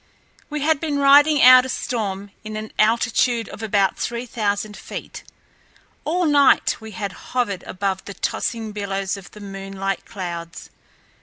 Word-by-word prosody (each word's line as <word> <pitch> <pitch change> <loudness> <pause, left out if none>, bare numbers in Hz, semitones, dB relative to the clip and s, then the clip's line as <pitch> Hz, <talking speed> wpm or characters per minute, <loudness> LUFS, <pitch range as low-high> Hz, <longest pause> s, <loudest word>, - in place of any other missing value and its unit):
We 300 -1 -3
had 310 0 +2
been 300 -2 -2
riding 285 +1 +6
out 255 0 +9
a 260 - -5
storm 205 -6 -3
at 215 0 -7
an 215 0 -6
altitude 230 +1 +2
of - - -9
about 205 -3 +1
three 240 +1 -3
thousand 210 -2 -2
feet. - - -8 0.8
All 350 +3 +1
night 285 -3 +4
we 220 - -8
had 205 -3 -4 0.3
hovered 200 -7 0
above 190 0 -2
the 200 - -8
tossing 225 -3 -2
billows 195 -2 -3
of 195 -3 -11
the 210 - -14
moonlight 195 -1 -4
clouds. 170 -3 -7
215 Hz, 150 wpm, -22 LUFS, 195-255 Hz, 0.8 s, out